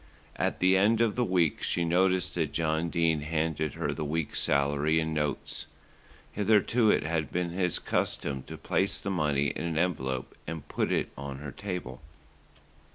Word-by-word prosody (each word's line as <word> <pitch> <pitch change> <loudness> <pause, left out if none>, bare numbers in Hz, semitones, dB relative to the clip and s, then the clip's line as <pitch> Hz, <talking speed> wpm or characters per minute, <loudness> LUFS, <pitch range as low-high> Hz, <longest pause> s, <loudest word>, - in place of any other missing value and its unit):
At - - -1
the 95 +1 +5
end 110 +4 +4
of 115 -3 +2
the 125 - +2
week 90 -7 +1
she 85 - 0
noticed 90 +1 +2
that 80 -4 -1
John 80 +1 0
Dene 80 -2 +1
handed 80 -1 -1
her - - -1
the - - -4
week's 75 +1 -1
salary 70 +3 +2
in 80 0 -1
notes. 75 -2 -2 0.6
Hitherto 110 +2 +3
it - - +3
had 80 -1 -1
been 90 -1 -1
his 90 -1 0
custom 70 -2 -1
to - - -7
place 95 +1 +1
the 100 - -3
money 75 -5 +1
in - - -4
an 85 -2 -2
envelope 65 -7 -1
and 80 -1 -6
put - - -1
it - - 0
on 70 0 -6
her 75 0 -7
table. 90 -8 -5
80 Hz, 170 wpm, -29 LUFS, 75-90 Hz, 0.6 s, the